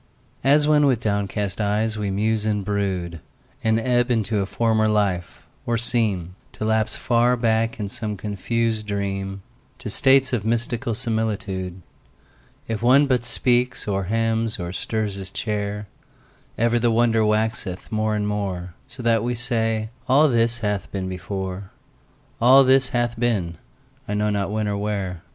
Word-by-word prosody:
As 145 +3 +4
when 150 -1 +5
with 130 -5 +2
downcast 100 -2 -2
eyes 105 +2 0
we 105 -2 -2
muse 105 +2 0
and 105 -2 -1
brood, 95 -5 -2 0.4
And 110 0 +2
ebb 120 +1 +1
into 110 -3 +1
a 95 - -1
former 110 0 +1
life, 100 -5 -1 0.2
or 120 0 +1
seem 110 -7 -1 0.2
To 110 - -4
lapse 110 -1 +1
far 120 +1 +2
back 115 0 +1
in 105 - -2
some 105 -1 -4
confused 110 +2 -2
dream 100 -1 -3 0.3
To - - -6
states 135 -1 +4
of 115 -5 0
mystical 115 +1 -1
similitude; 100 -5 -3 0.8
If 110 -2 -3
one 130 +4 +5
but 125 -4 +1
speaks 125 0 +1
or 100 -2 -1
hems 115 +1 0
or 90 0 -4
stirs 110 +2 -2
his 95 -1 -6
chair, 105 0 -3 0.7
Ever 120 +1 +2
the 120 0 +2
wonder 115 -1 +3
waxeth 105 -3 -1
more 110 0 0
and 105 -1 -1
more, 95 -4 -3
So 125 - -10
that 115 -2 +2
we 120 +1 -1
say, 115 -2 -1 0.2
"All 145 +4 +6
this 115 -2 +2
hath 105 -2 -2
been 95 -2 -3
before, 95 +1 -5 0.7
All 130 +3 +8
this 130 0 +4
hath 120 -3 -1
been, 95 -9 0 0.5
I 105 - -2
know 105 0 +1
not 100 -1 -1
when 110 0 -1
or 100 0 -1
where". 100 -4 -3
110 Hz, 155 wpm, -23 LUFS, 100-115 Hz, 0.8 s, All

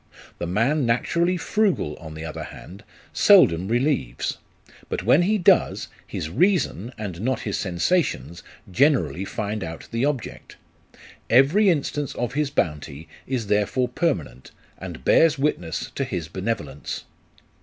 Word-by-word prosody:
The 85 - -3
man 115 - +1
naturally 170 +9 +1
frugal, 180 - 0
on 80 -1 -10
the 80 +1 -6
other 80 - -6
hand, 95 +3 -12 0.3
seldom 85 +3 +5
relieves; 120 - -1 0.5
but - - -3
when 125 - +5
he 210 +5 +2
does, 175 - +3 0.2
his - - -4
reason, 130 - +1
and 95 -5 -6
not 130 +3 -1
his 105 - -3
sensations, 90 - -1 0.3
generally 95 - +2
find 105 +1 -3
out 80 -1 -7
the 115 +3 0
object. 140 -6 -4 0.7
Every 145 - +5
instance 145 -3 -1
of 120 +1 -3
his 150 0 0
bounty 75 - -3 0.2
is 125 -4 -2
therefore 105 +5 +1
permanent, 125 - -2 0.3
and - - -8
bears 160 -2 +5
witness 110 - -2
to - - -2
his - - -4
benevolence. 70 - -4
115 Hz, 135 wpm, -23 LUFS, -, 0.7 s, seldom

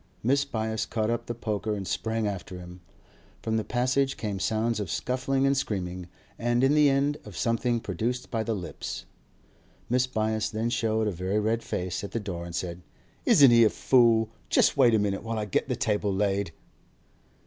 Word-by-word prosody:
Mrs. 140 +3 +2
Byass 110 -2 -2
caught 110 0 0
up 120 - -2
the 120 - -3
poker 110 -1 -2
and 95 -2 -5
sprang 110 -1 -1
after 95 -2 -4
him. 90 0 -11 0.6
From 110 0 0
the 110 - 0
passage 130 +3 0
came 105 -3 -3
sounds 110 +2 0
of 100 -5 -3
scuffling 130 +6 0
and 135 0 +3
screaming, 90 -8 -3 0.3
and 120 +1 +1
in 135 +2 +4
the 150 -1 +5
end 140 +2 +1
of 105 -5 -10
something 115 +1 +1
produced 115 +6 -3
by 115 -2 0
the 110 0 -1
lips. 90 -4 -6 0.9
Mrs. 125 0 +2
Byass 110 -2 0
then 115 +2 -2
showed 110 -2 +1
a - - +1
very 95 +4 -1
red 110 +2 0
face 90 -2 -3
at 100 - -7
the 115 - 0
door, 90 -5 -5
and 85 -1 -7
said: 90 -1 -4 0.5
'Isn't 140 -4 +7
he 115 0 +7
a 110 - +6
fool? 115 -3 +3 0.2
Just - - +4
wait 125 -5 +5
a - - +5
minute 100 -2 0
while 115 0 -4
I 105 - -1
get 105 - -1
the - - 0
table 105 -1 0
laid. 100 -2 0
110 Hz, 190 wpm, -27 LUFS, 100-120 Hz, 0.9 s, Isn't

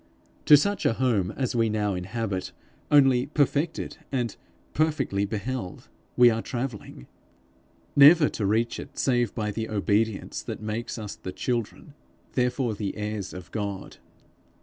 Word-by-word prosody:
To 150 - +9
such 200 +8 0
a - - +2
home 115 -7 +1
as 130 -3 -1
we 115 -1 +2
now 105 -2 0
inhabit, 95 +1 -4 0.4
only 135 -3 +5
perfected, 145 +2 0
and 120 -5 -1 0.4
perfectly 150 -10 0
beheld, 105 -1 -5 0.3
we 120 -1 +7
are 115 0 -1
travelling 120 - -6 0.9
never 150 +2 +8
to 105 - -2
reach 115 +3 0
it - - -10
save 120 -4 +1
by 105 -2 -2
the 110 +1 -4
obedience 105 0 0
that - - -6
makes 110 +3 -4
us 105 -2 -6
the 95 - -7
children, 120 - -3 0.4
therefore 125 -1 0
the 100 -1 -4
heirs 105 -2 -4
of 90 -2 -10
God. 100 -3 -5
115 Hz, 140 wpm, -26 LUFS, 105-130 Hz, 0.9 s, To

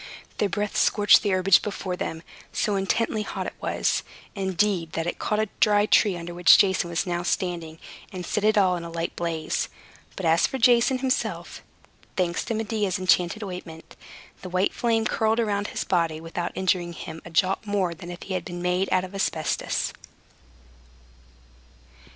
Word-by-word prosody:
Their 205 - +2
breath 205 +3 -2
scorched 205 -1 +5
the 205 - -1
herbage 185 -1 +4
before 195 -3 -4
them. 165 -2 -5 0.3
So 210 - 0
intensely 215 +3 0
hot - - -4
it - - -5
was, - - 0 0.3
indeed, 190 -3 0
that 165 - -2
it 175 - -3
caught 210 - 0
a 215 - +1
dry 205 -1 +4
tree 205 -3 +3
under 170 0 -7
which 175 +2 +7
Jason 190 -3 +2
was 170 +2 -1
now 175 -1 -1
standing, 175 -3 -2 0.3
and 180 -2 -6
set 210 - -1
it 215 0 +3
all 185 -3 +4
in 170 - -5
a 170 - -6
light 165 0 -4
blaze. 165 -2 -2 0.5
But 190 - -4
as 165 +1 +4
for 265 - -4
Jason 245 +1 +4
himself 260 0 -2 0.6
(thanks 175 -2 0
to 230 - -2
Medea's 210 -3 -1
enchanted 185 +2 +2
ointment), 180 -4 -8 0.5
the 185 - -7
white 185 +2 +1
flame 225 -2 +1
curled 220 +1 +1
around 205 -3 0
his - - -3
body, 165 -3 0
without 170 +2 -4
injuring 180 -2 0
him 160 0 -8
a - - -10
jot 190 +5 +1
more 195 -4 0
than 175 +1 -10
if 175 0 -8
he 195 - -5
had 185 -2 -2
been 175 0 -7
made 180 +2 0
of 185 +1 0
asbestos. 165 -5 -1
185 Hz, 175 wpm, -25 LUFS, 175-205 Hz, 0.6 s, which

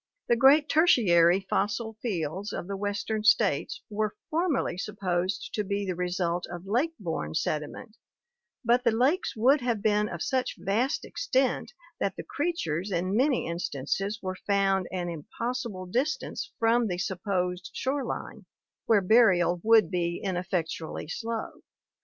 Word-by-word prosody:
The 235 - +5
great 280 +5 +6
Tertiary 190 - +5
fossil 215 +4 -1
fields 190 -2 -3
of - - -4
the 200 - -3
western 205 +2 -2
states 460 - +2
were 215 0 -2 0.2
formerly 320 - 0
sup 205 +3 -6
posed 185 0 -1
to 210 - 0
be 200 0 -2
the 185 - -1
result 180 0 -1
of 175 +1 -8
lake 260 +11 0
borne 160 - -4
sediment, 155 +10 -3 0.7
but 240 +2 +3
the 240 - +4
lakes 260 - +1
would 260 +6 +4
have 235 -4 -1
been 210 -1 +2
of 170 -2 -4
such 260 -1 -1
vast 235 +8 0
extent 270 - 0 0.3
that 195 - -1
the - - -6
creatures 205 - -2
in 185 +2 0
many 260 +2 +2
instances 170 +4 -2
were 185 0 -3
found 195 -2 +2
an 180 -1 -3
impossible 205 - -4
distance 295 - -2
from 230 +1 +3
the 180 -3 -2
supposed 180 -1 -2
shore 270 +1 -1
line, 240 - -6 0.4
where 215 -3 +5
burial 185 -4 +4
would 220 -6 +5
be 175 -1 -1
ineffectually 180 -5 -3
slow. 225 +6 -5
205 Hz, 145 wpm, -28 LUFS, 180-235 Hz, 0.7 s, great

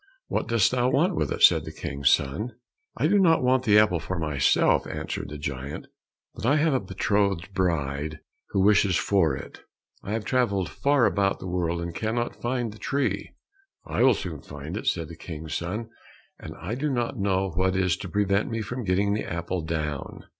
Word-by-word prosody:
"What - - -1
dost 115 -4 +3
thou 125 0 +2
want 170 +8 +2
with - - -1
it?" - - -1
said - - +7
the - - -7
King's 70 -1 -1
son. 105 - 0 0.4
"I 130 - +1
do 200 +6 +4
not 165 -7 +4
want 130 0 +2
the 105 -2 +6
apple 105 -5 +4
for 95 +3 -4
myself," 75 -5 +2
answered - - -4
the 75 - -6
giant, 70 0 -5 0.5
"but - - -10
I 130 +6 +4
have 155 0 +3
a 130 - +2
betrothed 100 -1 0
bride 75 -5 -1 0.3
who 95 - +1
wishes 100 -2 +4
for 85 -9 +2
it. - - -10 0.4
I 100 - -5
have 110 -2 -2
travelled 100 - +1
far 140 - +2
about 100 -1 +1
the - - -9
world 85 -1 -1
and 85 0 -4
cannot 115 +5 -2
find 120 -2 -1
the 105 - -14
tree." 140 0 -1 0.6
"I - - -1
will 130 -2 +6
soon 85 -7 -6
find 75 +5 -8
it," 105 - -5
said 85 -3 0
the 85 - -10
King's 80 -2 -7
son, 105 +9 -4 0.5
"and - - -8
I 95 +6 -4
do 145 +5 -1
not 120 -2 -2
know 95 -1 +1
what 95 +3 +1
is 95 -2 +2
to 95 - -7
prevent 100 +1 +1
me 115 -1 -2
from 125 +4 -5
getting 100 +1 +1
the 105 - -3
apple 85 +1 -2
down." 75 -3 -4
95 Hz, 195 wpm, -26 LUFS, 85-115 Hz, 0.6 s, said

